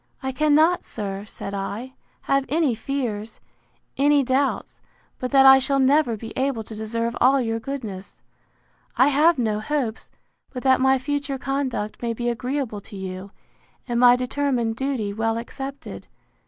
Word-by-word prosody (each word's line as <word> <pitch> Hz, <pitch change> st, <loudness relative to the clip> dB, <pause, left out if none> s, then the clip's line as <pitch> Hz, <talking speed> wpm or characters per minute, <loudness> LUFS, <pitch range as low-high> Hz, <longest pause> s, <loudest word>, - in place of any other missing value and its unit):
I 265 Hz, -, -1 dB
cannot, 305 Hz, +5 st, +3 dB
sir, 200 Hz, -2 st, -5 dB
said 200 Hz, -1 st, -8 dB
I, 205 Hz, +6 st, -5 dB, 0.3 s
have 275 Hz, 0 st, +1 dB
any 300 Hz, -3 st, +2 dB
fears, 225 Hz, -4 st, -4 dB, 0.6 s
any 285 Hz, 0 st, +4 dB
doubts, 265 Hz, +2 st, -1 dB, 0.4 s
but 255 Hz, -, -3 dB
that 270 Hz, 0 st, +5 dB
I 265 Hz, 0 st, +9 dB
shall 275 Hz, +1 st, 0 dB
never 270 Hz, -3 st, +3 dB
be 225 Hz, +1 st, -8 dB
able 260 Hz, -4 st, -1 dB
to 220 Hz, -, -11 dB
deserve 230 Hz, +2 st, -3 dB
all 270 Hz, +2 st, +5 dB
your 225 Hz, -2 st, -1 dB
goodness. 225 Hz, -7 st, -7 dB, 0.8 s
I 260 Hz, -, +5 dB
have 305 Hz, +3 st, +4 dB
no 215 Hz, -4 st, 0 dB
hopes, 230 Hz, -1 st, -3 dB, 0.4 s
but 250 Hz, -2 st, -6 dB
that 260 Hz, -1 st, +4 dB
my 265 Hz, 0 st, +4 dB
future 280 Hz, +1 st, -3 dB
conduct 265 Hz, -6 st, -3 dB
may 235 Hz, -1 st, -1 dB
be 240 Hz, +1 st, -1 dB
agreeable 245 Hz, -2 st, -3 dB
to 205 Hz, -, -12 dB
you, 190 Hz, 0 st, -6 dB, 0.6 s
and 240 Hz, -1 st, -1 dB
my 245 Hz, 0 st, +7 dB
determined 250 Hz, -2 st, -1 dB
duty 250 Hz, -6 st, -2 dB
well 225 Hz, +1 st, -1 dB
accepted. 270 Hz, +4 st, -7 dB
255 Hz, 155 wpm, -23 LUFS, 225-275 Hz, 0.8 s, I